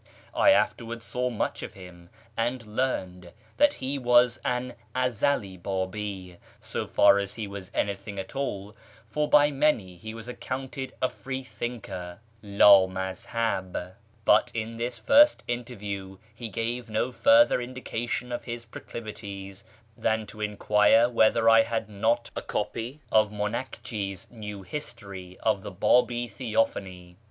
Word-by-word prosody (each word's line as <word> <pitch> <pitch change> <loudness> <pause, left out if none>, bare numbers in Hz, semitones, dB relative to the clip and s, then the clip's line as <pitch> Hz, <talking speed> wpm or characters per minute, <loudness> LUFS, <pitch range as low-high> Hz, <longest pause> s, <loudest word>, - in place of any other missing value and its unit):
I - - +5
afterwards 115 - +1
saw 125 0 -1
much 115 - -2
of - - -7
him, 90 -2 -13 0.3
and 120 +1 -1
learned 95 -7 -3 0.2
that 290 0 +4
he 135 +2 -3
was 120 -1 +4
an 125 0 -1 0.2
Ezeli 125 -5 0
Babi, 95 -1 -4 0.2
so - - -4
far 100 0 +5
as 100 -1 -4
he 110 - -4
was 100 -2 -7
auytliing 100 0 -3
at 95 +6 -6
all 105 -6 -3 0.3
(for 150 +6 -1
by 145 0 +6
many 135 -11 +1
he 110 +5 -8
was 115 0 -8
accounted 130 +1 -5
a - - +5
free 130 0 -6
thinker, 100 -9 -6 0.2
" 115 - -33
lA 100 -2 +7
maz 95 0 -5
hah 115 -4 0 0.4
"); 110 0 -33
but 110 +4 +5
in 115 0 -3
this 120 +1 -3
first 295 +1 +5
interview 100 -6 -5 0.2
he 115 +1 -7
gave 115 +2 -3
no 110 +4 0
further 285 - +5
indica 120 -1 -5
tion 125 +2 -2
of 120 -1 -4
his 120 -1 -5
proclivities 100 -4 -8 0.3
than 110 -1 0
to 105 +1 -11
enquire 105 +2 +4
whether 115 0 +4
I 115 0 +8
had 115 -1 -2
not 115 +3 0
a - - -3
copy 125 +6 -4
of 110 -1 +4
M;inakji's 105 -2 -4
New 105 -4 -7
History 100 -7 -7
of 110 -3 +2
the - - -6
Babi 120 +5 +2
Theophany. 100 -5 -2
110 Hz, 145 wpm, -27 LUFS, 100-125 Hz, 0.4 s, I